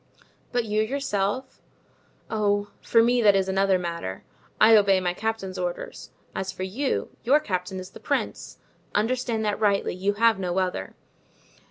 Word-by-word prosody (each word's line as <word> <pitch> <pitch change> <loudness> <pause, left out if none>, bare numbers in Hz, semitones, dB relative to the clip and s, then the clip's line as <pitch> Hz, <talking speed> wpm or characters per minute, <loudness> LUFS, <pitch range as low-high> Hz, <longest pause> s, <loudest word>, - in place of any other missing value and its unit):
"But 245 -2 0
you 215 0 +1
yourself?" 220 -2 -2 0.7
"Oh, 205 -1 0
for 230 -1 +4
me; 245 +1 +3
that 205 -3 +6
is 190 -1 +2
another 195 0 +2
matter. 170 - -5 0.4
I 225 0 +8
obey 200 -2 +5
my 180 -1 -1
captain's 220 -2 -3
orders. - - -5 0.2
As 190 0 -3
for 185 0 -6
you, 245 +9 -1
your 275 +5 +5
captain 185 -7 -3
is 185 - -9
the - - -12
prince, - - -3 0.4
understand 230 0 0
that 210 0 -1
rightly; 205 -2 +2
you 195 +3 0
have 225 -1 +3
no 180 -1 -2
other. 180 - -2
205 Hz, 155 wpm, -25 LUFS, 190-230 Hz, 0.7 s, I